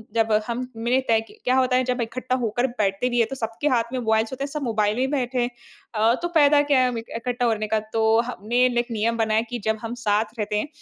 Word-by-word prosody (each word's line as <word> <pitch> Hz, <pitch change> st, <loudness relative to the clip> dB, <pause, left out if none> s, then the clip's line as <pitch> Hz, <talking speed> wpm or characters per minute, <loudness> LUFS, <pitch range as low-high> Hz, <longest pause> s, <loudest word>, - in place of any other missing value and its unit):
जब 225 Hz, -1 st, +2 dB, 0.2 s
हम 245 Hz, +1 st, -3 dB
मैंने 240 Hz, +3 st, +1 dB
तय 225 Hz, -1 st, +3 dB
कि -, -, -16 dB
क्या 255 Hz, +1 st, +2 dB
होता 255 Hz, -1 st, +3 dB
है 255 Hz, -, +3 dB
जब 250 Hz, 0 st, -1 dB
इकट्ठा 250 Hz, +2 st, -2 dB
होकर 240 Hz, +3 st, 0 dB
बैठते 215 Hz, -1 st, -1 dB
भी 240 Hz, -, -1 dB
हैं 230 Hz, -, +3 dB
तो 270 Hz, -, -4 dB
सबके 230 Hz, +3 st, -3 dB
हाथ 245 Hz, -5 st, +3 dB
में 255 Hz, -, -1 dB
मोबाइल्स 220 Hz, 0 st, +1 dB
होते 265 Hz, +1 st, -4 dB
हैं 280 Hz, -, -3 dB
सब 300 Hz, 0 st, -4 dB
मोबाइल 215 Hz, -3 st, 0 dB
ही 260 Hz, -, +2 dB
बैठे 260 Hz, -3 st, -1 dB
हैं। 240 Hz, -, 0 dB, 0.5 s
अ, 220 Hz, +2 st, +4 dB
तो 345 Hz, -, 0 dB
फ़ायदा 295 Hz, -3 st, +5 dB
क्या 270 Hz, -, +5 dB
है 255 Hz, -, +4 dB
हमें 235 Hz, -2 st, -3 dB
इकट्ठा 245 Hz, +2 st, -3 dB
होने 215 Hz, -2 st, 0 dB
का 220 Hz, +1 st, +1 dB
तो 220 Hz, 0 st, +2 dB
हम 235 Hz, -4 st, -8 dB
मेन 245 Hz, 0 st, +3 dB
एक 240 Hz, +1 st, +1 dB
नियम 230 Hz, +1 st, 0 dB
बनाया 220 Hz, -1 st, +2 dB
कि 245 Hz, -1 st, -4 dB
जब 220 Hz, 0 st, +1 dB
हम 230 Hz, +1 st, -5 dB
साथ 210 Hz, +1 st, +2 dB
रहते 210 Hz, 0 st, -2 dB
हैं -, -, -3 dB
240 Hz, 260 wpm, -23 LUFS, 220-255 Hz, 0.5 s, फ़ायदा